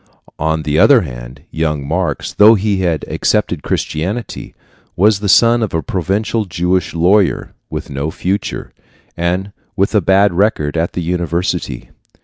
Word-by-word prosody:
On 80 0 -1
the 75 +1 0
other - - +6
hand, - - -9
young 75 -3 -2
Marx, 85 -2 -2
though 110 +2 +7
he 100 -1 0
had 85 -4 -1
accepted - - 0
Christianity, 95 +9 -4 0.4
was 105 +2 +3
the 105 -1 -2
son 120 +3 +5
of 110 -6 -2
a 80 - -1
provincial 100 +5 -1
Jewish 90 0 -1
lawyer, 95 +4 +2 0.2
with - - -6
no 70 +3 -3
fortune, 95 +5 -3 0.4
and 90 +3 -2 0.2
with 100 +1 0
a 105 - +3
bad 95 +2 +3
record 85 -6 0
at 85 +1 -1
the 90 - -3
university. 85 0 -2
90 Hz, 145 wpm, -16 LUFS, 80-100 Hz, 0.4 s, though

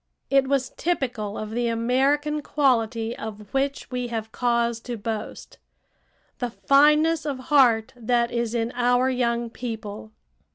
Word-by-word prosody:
It 275 -1 +4
was 270 -2 0
typical 245 -11 -2
of 215 0 -5
the 240 +1 -1
American 270 +6 +1
quality 230 -6 +1
of 210 -2 -8
which 275 +1 -1
we 250 -1 -2
have 220 -2 -4
cause 235 -1 0
to 240 0 -6
boast 220 +1 -6 0.8
the 245 - -1
fineness 300 +6 +4
of 290 -3 -3 0.2
heart 245 -3 +4
that 235 0 0
is 235 -1 -1
in 230 0 -1
our 245 +1 +2
young 235 -2 -1
people. 220 -3 -6
240 Hz, 135 wpm, -24 LUFS, 225-270 Hz, 0.8 s, It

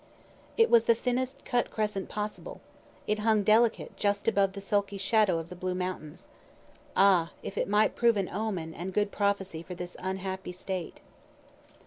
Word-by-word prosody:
It 455 0 +4
was 235 -1 +6
the 230 - +5
thinnest 250 +3 -2
cut 245 -2 0
crescent 210 -3 -2
possible. 210 0 -5 0.5
It 210 0 0
hung 215 -1 +3
delicate 220 +3 +3
just 205 0 0
above 200 -3 +3
the 200 - -6
sulky 200 0 -1
shadow 205 -2 +2
of 165 0 -6
the 180 - -8
Blue 180 0 -3
mountains. 180 -4 -5 0.7
Ah, 185 -4 +4
if - - -6
it - - 0
might 210 +1 +3
prove 235 -2 +3
an 195 -2 0
omen 185 -5 -3
and 180 +3 -6
good 205 -1 +1
prophecy 195 -5 -1
for 180 +2 -8
this 175 0 -6
unhappy 190 -1 -4
State. 180 -1 -5
200 Hz, 165 wpm, -29 LUFS, 185-215 Hz, 0.7 s, was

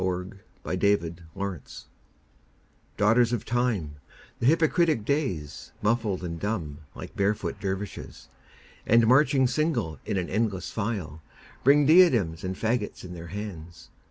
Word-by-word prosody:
Ralph 90 0 -2 0.3
Waldo 90 +2 0 0.5
Emerson 100 0 -2
Days 80 - -12 1.1
DAUGHTERS 115 +3 +3
of 115 -1 -2
Time, 115 -12 -1 0.4
the 120 - +1
hypocritic 160 - +3
Days, 120 - -2
Muffled 105 -4 0
and 85 -2 -5
dumb 80 -8 -3 0.2
like - - -9
barefoot 100 0 -1
dervishes, 100 0 -5 0.6
And 115 +1 +5
marching 130 +2 +4
single 125 - -1
in 105 -2 -2
an 90 -2 -1
endless 105 -4 -1
file, 100 -9 -4 0.4
Bring 145 +2 +5
diadems 125 - +5
and 95 0 -3
faggots 110 +1 -2
in 90 -1 -8
their 85 -1 -8
hands. 85 -4 -8
105 Hz, 130 wpm, -27 LUFS, 90-120 Hz, 1.1 s, And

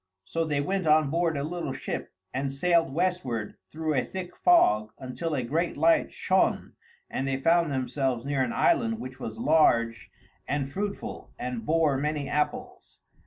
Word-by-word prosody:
So 165 0 -1
they 145 -2 0
went 185 +3 -1
on 155 -2 +4
board 165 -1 +1
a 140 - -2
little 165 -3 -3
ship - - -5 0.2
and 135 +1 -1
sailed 165 +1 +2
westward 145 - -1 0.2
through 155 0 -2
a 130 -3 +1
thick 185 -2 -7
fog 110 - +4
until 150 +5 -4
a 130 - -1
great 160 +8 -1
light 165 +2 +3
shone 190 0 +1 0.3
and 135 - -3
they 135 0 0
found 165 +2 +3
themselves 130 -1 -1
near 140 -1 0
an 130 - 0
island 235 -10 +2
which 130 -7 -8
was 110 -4 -6
large 115 -7 +2 0.4
and 140 -1 -1
fruitful 200 +4 -5
and 120 -3 -5
bore 155 -4 +2
many 150 -1 -2
apples. 150 0 -3
150 Hz, 165 wpm, -27 LUFS, 130-170 Hz, 0.4 s, on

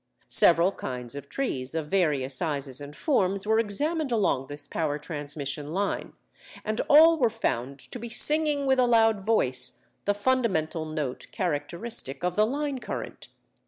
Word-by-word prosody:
"Several 170 +2 +5
kinds 125 -9 -6
of 140 0 -9
trees 135 - -3
of 155 -2 -3
various 150 -8 +1
sizes 140 -2 -1
and 145 +1 -9
forms 200 - +1
were 220 +1 +3
examined 290 +8 -1
along 185 - +1
this 145 +1 -6
power 150 -3 -2
transmission 145 -1 -5
line, 200 +1 -2 0.5
and 215 0 -1
all 320 +2 +7
were 240 -4 +4
found 140 - -2
to 245 - -9
be 235 +1 -6
singing 295 +4 +2
with 265 -1 +3
a 250 - +4
loud 225 -3 +3
voice 190 - +1 0.2
the 205 - +1
fundamental 205 -9 0
note 155 -5 -4
characteristic 170 - -1
of 180 0 -1
the 215 +1 +3
line 285 +1 -2
current. - - -7
185 Hz, 155 wpm, -27 LUFS, 145-235 Hz, 0.5 s, all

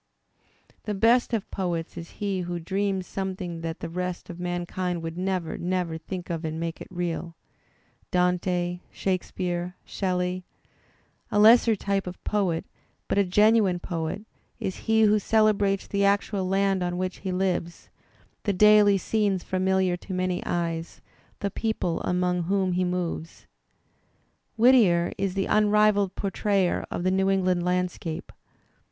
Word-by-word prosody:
The 210 - -2
best 235 +5 +3
of 225 -4 -2
poets 175 -4 -3
is 170 - -7
he 200 -2 -1
who 175 0 -3
dreams 190 +2 -1
something 185 -3 -4
that 165 +1 -5
the - - -3
rest 180 +1 -4
of 175 - -10
mankind 175 0 -3
would 165 0 -4
never, 185 -2 -2
never 180 -2 -1
think 175 +2 -6
of 165 0 -3
and 160 0 -3
makes 165 0 -4
it - - -7
real 175 -1 -4 0.4
— - - -38
Dante, 180 0 0
Shakespeare, 180 -1 -2
Shelley. 180 -1 -2 0.9
A - - +1
lesser 225 +1 +7
type 195 -1 -1
of 180 - -8
poet, 190 -6 0 0.4
but - - +1
a - - +5
genuine 210 0 +4
poet, 170 +2 -4 0.4
is 190 - -3
he 220 0 +5
who 210 0 +5
celebrates 205 -2 +2
the 200 0 -1
actual 200 -1 +1
land 195 0 +1
on 175 0 -1
which 185 0 -2
he 190 - -4
lives, 180 -2 -2 0.5
the 205 - 0
daily 210 +1 +6
scenes 200 -2 0
familiar 185 -1 +1
to 185 +1 -7
many 185 -1 -1
eyes, 165 -1 -2 0.4
the 200 - -1
people 220 -7 -1
among 180 -1 0
whom 190 0 +1
he 180 +1 +1
moves. 180 -2 -3 1.1
Whittier 220 -8 +5
is 195 -1 -1
the 195 - 0
unrivalled 210 -2 +3
portrayer 195 -1 0
of 175 - -3
the 185 - +2
New 190 0 +2
England 185 -2 +2
landscape. 180 -2 -2
185 Hz, 145 wpm, -26 LUFS, 175-200 Hz, 1.1 s, lesser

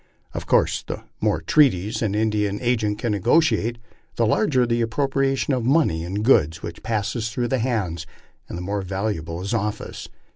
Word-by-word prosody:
Of - - -5
course - - +2
the - - -7 0.2
more - - +1
treaties 110 -7 +3
an 105 -3 0
Indian 105 -2 0
agent 110 -4 0
can 115 0 -2
negotiate, 115 - +2 0.4
the 115 - +2
larger 130 - +2
the 120 0 0
ap 115 - 0
propriation 135 +2 0
of 125 - -2
money 125 - +2
and 100 +5 -3
goods 85 - +3
which 85 - -7
passes 110 +1 -2
through 120 +1 -2
his 130 -3 +1
hands, 95 -10 -2 0.4
and - - -5
the 90 - -5
more 100 +2 -2
valuable 95 -3 -3
his 100 +5 -3
office. 105 -1 -3
110 Hz, 175 wpm, -23 LUFS, 100-125 Hz, 0.4 s, treaties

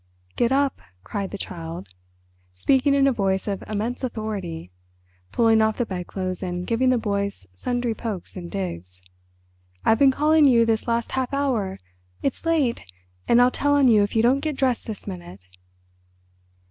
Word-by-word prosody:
"Get 240 +1 +1
up," 275 0 +1 0.2
cried 195 - -4
the 200 - -6
Child, 165 - -7 0.7
speaking 265 - +2
in 275 -1 +4
a 275 - +4
voice 195 -5 0
of 200 -2 -3
immense 220 +5 -3
authority, 205 - -4 0.6
pulling 225 - +4
off 220 0 +1
the 240 - 0
bedclothes 185 -1 -4
and 180 -1 -3
giving 240 +4 +2
the 255 - +3
boys 200 - -2
sundry 245 - -1
pokes 215 -5 -5
and 175 -2 -7
digs. 90 - -5 0.9
"I've 225 - +4
been 275 - +7
calling 300 +3 +4
you 235 -4 +5
this 225 0 0
last 235 0 0
half 260 -1 -1
hour. 235 -9 0 0.5
It's 275 +4 -2
late, 295 -8 +1 0.5
and 235 - +5
I'll 245 +1 +5
tell 285 +2 +1
on 275 -3 +5
you 215 -3 +5
if 205 +2 -1
you 225 - +3
don't 255 +4 +4
get 300 -1 -3
dressed 255 -3 0
this 215 -3 -6
minute." 90 +1 -8
225 Hz, 165 wpm, -24 LUFS, 190-255 Hz, 0.9 s, been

